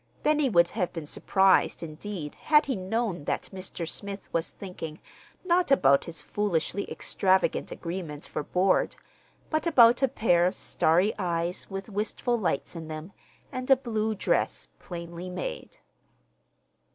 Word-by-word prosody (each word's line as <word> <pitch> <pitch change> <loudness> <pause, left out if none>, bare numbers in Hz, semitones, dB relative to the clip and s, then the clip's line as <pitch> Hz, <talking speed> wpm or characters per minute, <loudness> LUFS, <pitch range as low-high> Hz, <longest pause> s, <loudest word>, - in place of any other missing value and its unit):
Benny 300 -2 +3
would 170 -5 +4
have 180 -4 -2
been 165 -3 -6
surprised, 190 +4 +3
indeed, 160 0 -6
had 300 -1 +3
he 265 - -1
known 190 -4 -2
that - - -2
Mr. 185 -3 -5
Smith 200 +3 -6
was 165 0 0
thinking, 165 -5 -8 0.5
not 355 -2 +3
about 140 - +5
his 165 -1 -8
foolishly 200 -1 -1
extravagant 190 -1 +1
agreement 165 -4 -6
for - - -4
board, 185 +5 +1 0.6
but 310 +1 0
about 240 -6 +6
a 270 - +5
pair 180 -9 +3
of 185 - -2
starry 175 +6 +2
eyes 170 -1 -2
with 195 0 -5
wistful 215 +3 -1
lights 180 -5 -1
in 165 -1 -6
them, 155 +4 -7 0.4
and 255 +1 -5
a 270 - +9
blue 220 -4 -1
dress, 200 - 0
plainly 170 0 -7
made. 180 0 -6
190 Hz, 140 wpm, -27 LUFS, 170-220 Hz, 0.6 s, a